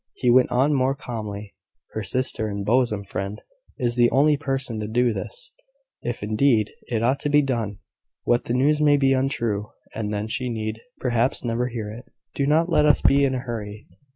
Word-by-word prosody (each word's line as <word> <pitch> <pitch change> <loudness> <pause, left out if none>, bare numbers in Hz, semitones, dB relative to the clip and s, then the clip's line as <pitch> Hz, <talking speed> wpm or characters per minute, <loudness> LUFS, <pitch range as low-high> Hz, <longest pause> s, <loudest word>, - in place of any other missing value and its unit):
He 125 - +2
went 125 +1 +5
on 135 +4 +2
more 135 0 +1
calmly: 105 -6 -6 0.4
"Her 110 - -4
sister 110 +2 +1
and 100 -1 -4
bosom 115 -3 +2
friend 100 +1 -5 0.4
is 120 -3 -1
the 120 -1 +4
only 145 +4 +4
person 135 -5 -2
to 105 - -3
do 120 +1 +2
this 485 - -6 0.5
if, 120 -3 -4
indeed, 110 0 +2 0.2
it 115 -2 -1
ought 130 +4 +2
to 145 - -1
be 145 0 +4
done. 115 -7 -2 0.5
But 120 0 +2
the 120 - -2
news 150 +4 +2
may 145 -1 +5
be 135 -1 +3
untrue; 120 -6 -1 0.2
and 105 -2 -3
then 105 0 -2
she 125 +3 -3
need 110 -1 -4 0.2
perhaps 120 0 0
never 120 +1 0
hear 115 -4 -5
it. 115 +4 -10 0.3
Do 140 - 0
not 160 +3 +3
let 150 -4 +3
us 145 - +4
be 140 +1 +5
in 130 -1 0
a - - -1
hurry." 110 -4 -6
120 Hz, 195 wpm, -23 LUFS, 110-135 Hz, 0.5 s, went